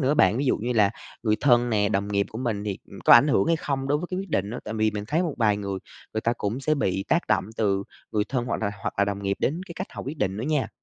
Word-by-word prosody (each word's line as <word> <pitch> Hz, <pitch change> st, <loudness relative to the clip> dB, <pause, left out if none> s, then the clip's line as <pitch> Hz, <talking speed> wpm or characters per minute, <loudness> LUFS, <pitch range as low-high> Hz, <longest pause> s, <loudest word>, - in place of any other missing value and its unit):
nữa 140 Hz, +2 st, +2 dB
bạn, 100 Hz, -6 st, +4 dB
ví 140 Hz, -, 0 dB
dụ -, -, +3 dB
như 120 Hz, +3 st, -2 dB
là 105 Hz, -3 st, +4 dB, 0.3 s
người 110 Hz, -2 st, +2 dB
thân 120 Hz, -3 st, +4 dB
nè, 105 Hz, -2 st, +2 dB
đồng 100 Hz, -1 st, 0 dB
nghiệp 100 Hz, -1 st, +1 dB
của 110 Hz, -, -6 dB
mình 110 Hz, -5 st, -2 dB
thì, 100 Hz, -2 st, -3 dB
ừm, 100 Hz, -, -10 dB
có -, -, +8 dB
ảnh 120 Hz, +5 st, +8 dB
hưởng 140 Hz, -, +3 dB
hay 165 Hz, 0 st, +3 dB
không 135 Hz, -3 st, -2 dB
đối 145 Hz, +1 st, +2 dB
với 175 Hz, -, -4 dB
cái 185 Hz, -, -2 dB
quyết 195 Hz, -3 st, -8 dB
định 100 Hz, -4 st, 0 dB
đó. 120 Hz, -, -4 dB
Tại 110 Hz, -, -5 dB
vì 110 Hz, 0 st, +2 dB
mình 105 Hz, 0 st, -4 dB
thấy 165 Hz, +4 st, +2 dB
một 165 Hz, -5 st, -2 dB
vài 105 Hz, -3 st, +3 dB
người, 100 Hz, -2 st, -3 dB, 0.4 s
người 110 Hz, -, 0 dB
ta 115 Hz, -, +1 dB
cũng 110 Hz, +6 st, -2 dB
sẽ 155 Hz, +3 st, +1 dB
bị 95 Hz, -8 st, -1 dB
tác 170 Hz, +2 st, +2 dB
động 95 Hz, -3 st, +2 dB
từ 100 Hz, -3 st, +1 dB, 0.3 s
người 105 Hz, -1 st, +1 dB
thân 125 Hz, -2 st, -1 dB
hoặc 115 Hz, -, -2 dB
là 100 Hz, -, +1 dB
hoặc -, -, -2 dB
là 100 Hz, -, +5 dB
đồng 100 Hz, 0 st, -3 dB
nghiệp 100 Hz, 0 st, 0 dB
đến 160 Hz, +6 st, 0 dB
cái 170 Hz, -, -9 dB
cách 185 Hz, -, -3 dB
họ -, -, -7 dB
quyết 145 Hz, +4 st, -6 dB
định 95 Hz, -2 st, 0 dB
nữa 110 Hz, -, -3 dB
nha, 150 Hz, -2 st, 0 dB
110 Hz, 315 wpm, -25 LUFS, 100-140 Hz, 0.4 s, có